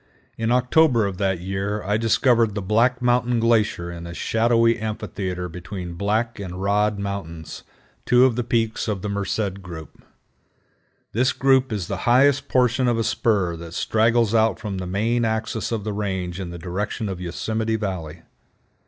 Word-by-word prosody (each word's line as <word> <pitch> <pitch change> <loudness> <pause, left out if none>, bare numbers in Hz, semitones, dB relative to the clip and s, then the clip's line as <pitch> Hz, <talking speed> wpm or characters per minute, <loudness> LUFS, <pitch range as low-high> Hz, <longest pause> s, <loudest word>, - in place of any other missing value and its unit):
In 115 +1 -1
October 125 -1 +4
of 95 -2 -4
that 95 -3 0
year 95 +3 -3
I 105 +2 0
discovered 115 -1 +2
the 105 - -2
Black 120 +5 +2
Mountain 120 -1 +2
Glacier 110 -7 +1
in 85 0 -8
a 85 - -8
shadowy 115 +2 +2
amphitheater 95 -4 -4
between 90 +1 -7
Black 110 +5 -1
and 90 -2 -6
Rod 105 +2 +1
Mountains, 100 -5 -6 0.4
two 125 +1 +5
of 125 -3 +2
the 125 - -1
peaks 115 -1 -1
of 100 -4 -2
the 105 - -2
Merced 100 0 -2
group. 85 -4 -10 1.1
This 125 +4 +2
group 135 -1 +3
is 100 -5 -3
the 100 - -3
highest 140 +3 +4
portion 125 0 +2
of 120 -1 +2
a 115 - +1
spur 100 -7 +1
that 85 0 -9
straggles 115 0 +2
out 110 0 +3
from 100 -4 -4
the 90 - -5
main 115 +6 0
axis 110 0 -2
of 110 -3 -2
the 105 0 -3
range 95 -3 -3
in 95 -2 -5
the 85 - -7
direction 100 +5 -3
of 95 -2 -5
Yosemite 110 +5 -2
Valley. 90 -6 -4
105 Hz, 170 wpm, -23 LUFS, 95-115 Hz, 1.1 s, two